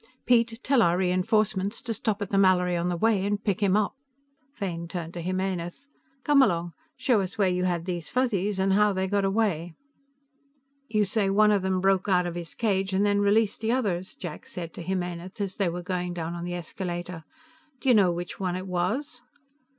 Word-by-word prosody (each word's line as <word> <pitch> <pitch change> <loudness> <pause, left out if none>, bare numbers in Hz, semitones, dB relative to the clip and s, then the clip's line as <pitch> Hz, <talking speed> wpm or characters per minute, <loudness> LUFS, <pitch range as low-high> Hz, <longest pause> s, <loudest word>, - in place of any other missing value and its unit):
Piet, 235 -2 +3
tell 265 -2 +3
our 175 -3 +3
re 180 -1 +1
enforcements 205 +1 +1
to 235 - -2
stop 210 -2 -1
at 195 - -8
the 200 - +2
Mallory 180 -2 +4
on 175 +1 0
the 175 - -1
way 215 0 +2
and 205 +1 -1
pick 200 -1 -1
him 200 0 +3
up." 215 - 0 0.6
Fane 170 -5 -4
turned 170 -1 -5
to 175 - -5
Jimenez. 185 +6 -3 0.3
"Come 290 -2 +5
along; 170 -8 +1 0.2
show 235 -6 +2
us 195 +3 -5
where 200 -2 +3
you 180 0 0
had 175 -2 -1
these 175 -4 -3
Fuzzies 210 -6 0
and 190 0 +2
how 210 +1 +4
they 190 0 0
got 200 0 +1
away." 195 -5 0 1.1
"You 215 -1 +2
say 200 0 +1
one 210 +2 +4
of 205 -2 +2
them 190 0 0
broke 195 +1 +2
out 180 -2 +3
of 175 - -3
his 170 -2 -6
cage 195 -4 0
and 195 +2 +2
then 205 0 +2
released 210 +1 +2
the 225 +1 +1
others," 190 -8 -1
Jack 175 -4 -8
said 170 -2 -6
to - - -8
Jimenez 180 +1 -4
as 195 -2 -3
they 195 -4 +1
were 175 +1 -5
going 180 -1 -3
down 165 0 -4
on 175 0 -5
the 175 0 -3
escalator. 175 0 -5 0.6
"Do 270 - -6
you 250 - +7
know 200 -5 +5
which 175 +1 -5
one 185 -2 -1
it 185 +1 -4
was?" 220 - -2
190 Hz, 210 wpm, -26 LUFS, 175-210 Hz, 1.1 s, you